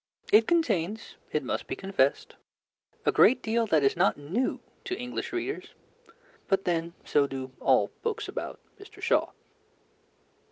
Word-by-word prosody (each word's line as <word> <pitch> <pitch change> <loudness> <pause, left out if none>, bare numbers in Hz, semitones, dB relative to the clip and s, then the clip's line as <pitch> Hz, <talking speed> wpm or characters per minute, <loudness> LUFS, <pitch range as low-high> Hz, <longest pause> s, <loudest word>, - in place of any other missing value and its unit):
It 220 +1 +7
contains, 220 - 0 0.2
it 150 - 0
must - - -3
be - - -3
confessed, 190 -8 0 0.7
a - - +4
great 260 - +5
deal 230 +1 +1
that 155 -6 +3
is 135 - +3
not 180 +3 +3
new 175 - -1 0.3
to 370 -1 -3
English 245 0 -4
readers, 370 +3 -4 0.7
but 195 -1 +1
then 170 -1 -1
so 145 -1 +3
do 130 -1 -6
all - - +3
books 460 -2 -2
about - - -5 0.2
Mr. 400 - -14
Shaw. - - +2
195 Hz, 145 wpm, -28 LUFS, 150-245 Hz, 0.7 s, It